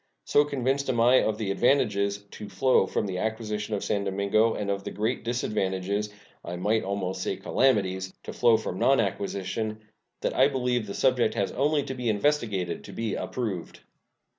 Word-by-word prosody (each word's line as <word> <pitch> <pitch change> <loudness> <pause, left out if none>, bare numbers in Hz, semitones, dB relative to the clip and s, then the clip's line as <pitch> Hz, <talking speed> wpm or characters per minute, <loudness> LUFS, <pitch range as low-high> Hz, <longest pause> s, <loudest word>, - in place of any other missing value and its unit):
So 145 - +4
convinced 140 0 -1
am 120 -3 +1
I 125 +3 +6
of 110 -1 0
the 105 -3 -2
advantages 100 -3 +2
to 105 - -8
flow 130 -6 +3
from - - -1
the 95 -2 -3
acquisition 110 -1 -2
of 100 - -3
San 100 -1 0
Domingo, 100 +3 +2
and 100 -1 -2
of 100 0 -3
the - - -4
great 110 +4 -2
disadvantages 105 -3 -1 0.3
I 85 - -5
might 105 +5 +1
almost 95 -1 -3
say - - -2
calamities 95 -7 +1
to - - -7
flow 120 -2 +4
from 100 -4 -5
nonacquisition, 110 -4 0 0.4
that - - -1
I 130 - +6
believe 125 -5 -1
the 100 - -5
subject 125 -4 +2
has 100 - 0
only 145 +1 +1
to 135 -1 -5
be 125 -3 -2
investigated 105 - 0
to - - -9
be 115 -2 -3
approved. 105 -9 -4
110 Hz, 175 wpm, -27 LUFS, 100-125 Hz, 0.4 s, I